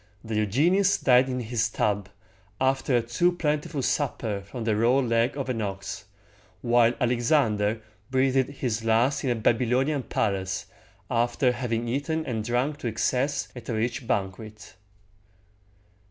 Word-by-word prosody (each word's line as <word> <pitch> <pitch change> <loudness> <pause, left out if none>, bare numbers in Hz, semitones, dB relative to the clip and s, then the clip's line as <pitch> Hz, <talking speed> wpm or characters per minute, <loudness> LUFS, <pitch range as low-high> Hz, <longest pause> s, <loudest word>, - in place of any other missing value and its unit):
Diogenes 140 - +2
died 125 +1 +4
in 125 -1 -2
his 115 -1 -1
tub, 105 -2 -1 0.5
after 130 -1 +2
a 120 - 0
too 120 +10 +2
plentiful 150 -3 -2
supper 115 -9 -1
from 105 +4 -7
the 110 -1 +1
raw 120 +4 +3
leg 120 +1 +1
of 135 - -3
an 120 -3 -2
ox; 100 0 -5 0.6
while 120 0 +4
Alexander 115 -3 +1 0.3
breathed 130 0 +2
his 120 -5 -3
last 120 +6 +2
in 135 - 0
a 120 - +2
Bab 115 +1 +2
y 125 - 0
lo´ni 135 +5 +1
an 140 - -1
palace, 95 -5 -2 0.5
after 120 +2 +2
having 120 -1 -2
eaten 155 +6 -1
and 110 -3 -2
drunk 125 +6 -1
to 125 - -4
excess 130 +5 0
at 120 -2 -9
a 115 - -1
rich 115 +2 -2
banquet. 105 +2 -4
120 Hz, 150 wpm, -26 LUFS, 110-135 Hz, 0.6 s, died